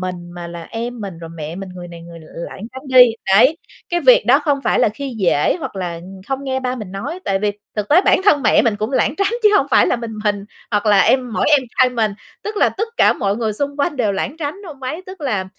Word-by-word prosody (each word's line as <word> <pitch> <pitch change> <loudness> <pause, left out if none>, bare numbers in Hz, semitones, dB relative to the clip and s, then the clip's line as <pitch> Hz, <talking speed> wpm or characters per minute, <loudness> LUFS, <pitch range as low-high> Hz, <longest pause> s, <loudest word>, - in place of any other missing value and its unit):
mình, 180 -1 -6
mà 175 -1 -7
là 170 -1 -8
em 235 +4 -6
mình, 195 -5 -7
rồi 165 -1 -9
mẹ 155 +1 -6
mình 195 0 -7
người 175 -1 -9
này 170 -1 -11
người 170 0 -11
nữa 160 -1 -16
lảng 180 +3 -7
tránh 260 - -9
đi, 255 -1 +8 0.3
đấy. 260 +10 +5 0.3
Cái 345 0 0
việc 255 -7 +5
đó 260 +4 +6
không 290 -2 0
phải - - +2
là - - +4
khi 255 +3 -6
dể, 170 - +2
hoặc 265 -9 -6
là 175 -3 -4 0.3
không 270 0 -3
nghe 265 -1 -2
ba 255 0 -2
mình 210 -6 -8
nói, 325 - -5
tại 195 - 0
vì 205 +1 0 0.2
thực 210 -1 -2
tế 315 +5 +6
bản - - +4
thân 295 -9 +4
mẹ 220 - +4
mình 225 -4 +1
cũng 215 +3 -3
lảng 270 - +1
tránh 395 +2 0
chứ 425 - +7
hông 280 - +2
phải - - +5
là - - +1
mình 230 -1 -6
mình, 205 -1 0 0.3
hoặc 210 0 0
là 205 -2 +5
em 250 +4 +2
mỗi - - 0
em 290 -2 +6 0.2
trai 255 - +6
mình, 225 -4 0 0.3
tức 425 0 -5
là - - +4
tất 440 +4 -4
cả - - +5
mọi 200 +1 -1
người 225 -2 -1
xung 285 +6 -3
quanh 290 +1 -1
đều 215 -5 +1
lảng 250 +10 -3
tránh 300 +1 -4
ông 285 -5 -11
ấy. 310 +8 -4
Tức 375 -1 -10
là 215 -10 -1
230 Hz, 270 wpm, -18 LUFS, 195-280 Hz, 0.3 s, đi